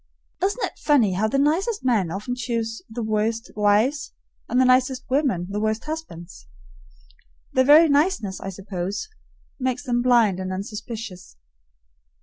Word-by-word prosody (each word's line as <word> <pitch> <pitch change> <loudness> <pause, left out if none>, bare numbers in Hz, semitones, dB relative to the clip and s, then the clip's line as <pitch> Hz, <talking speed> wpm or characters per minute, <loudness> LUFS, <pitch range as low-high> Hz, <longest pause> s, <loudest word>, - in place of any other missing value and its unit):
Isn't 405 +6 0
it - - -9
funny 245 -10 +3
how 205 +4 +1
the 245 - -1
nicest 335 - +1
men 215 -9 +2
often 205 +8 -4
choose 230 -2 -3
the 230 +1 -5
worst 220 +2 -1
wives, 215 +8 +1 0.4
and 250 - +2
the 260 - +5
nicest 255 +1 +2
women 260 - +1
the 200 +2 -3
worst 215 +1 -1
husbands? 190 - -8 1.1
Their 260 - +3
very 305 +4 +8
niceness, 285 - +1
I 195 - -5
suppose, 195 - -5 0.5
makes 255 -1 -2
them 240 -1 0
blind 235 -6 +3
and 185 0 -4
unsuspicious. 205 - -7
230 Hz, 140 wpm, -23 LUFS, 205-265 Hz, 1.1 s, very